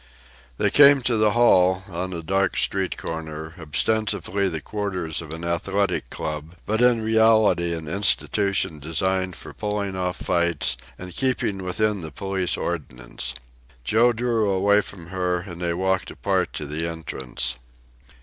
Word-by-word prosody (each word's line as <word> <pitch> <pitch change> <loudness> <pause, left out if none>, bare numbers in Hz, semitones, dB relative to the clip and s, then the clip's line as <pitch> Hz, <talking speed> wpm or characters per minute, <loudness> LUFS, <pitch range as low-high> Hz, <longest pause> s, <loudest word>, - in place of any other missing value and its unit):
They - - +2
came 140 -2 +7
to 120 - +1
the 110 -1 +3
hall, 95 -6 +4
on 95 0 -4
a 85 -2 -5
dark 95 +3 0
street 95 -1 0
corner, 80 0 -6
ostensibly 100 +4 +1
the 80 -3 -3
quarters 95 -4 -3
of 80 - -10
an 80 +1 -5
athletic 95 +4 0
club, 75 +2 -5
but 110 +2 0
in 120 -2 +4
reality 110 -6 +4
an 80 -2 -7
institution 100 -1 +1
designed 95 +4 -1
for - - -10
pulling 105 -2 -3
off 90 -1 -2
fights 85 -7 +1 0.2
and 90 -1 -9
keeping 115 -7 0
within 105 +2 0
the 80 - -6
police 95 +3 -1
ordinance. 65 -6 -4 0.5
Joe 115 - +4
drew 115 -2 0
away 100 +2 +3
from 85 -5 -9
her, 90 -1 -1
and 85 -2 -9
they 85 -1 0
walked 95 +1 0
apart - - -1
to 75 - -5
the 75 +3 -2
entrance. 70 -7 -3
95 Hz, 150 wpm, -24 LUFS, 80-105 Hz, 0.5 s, came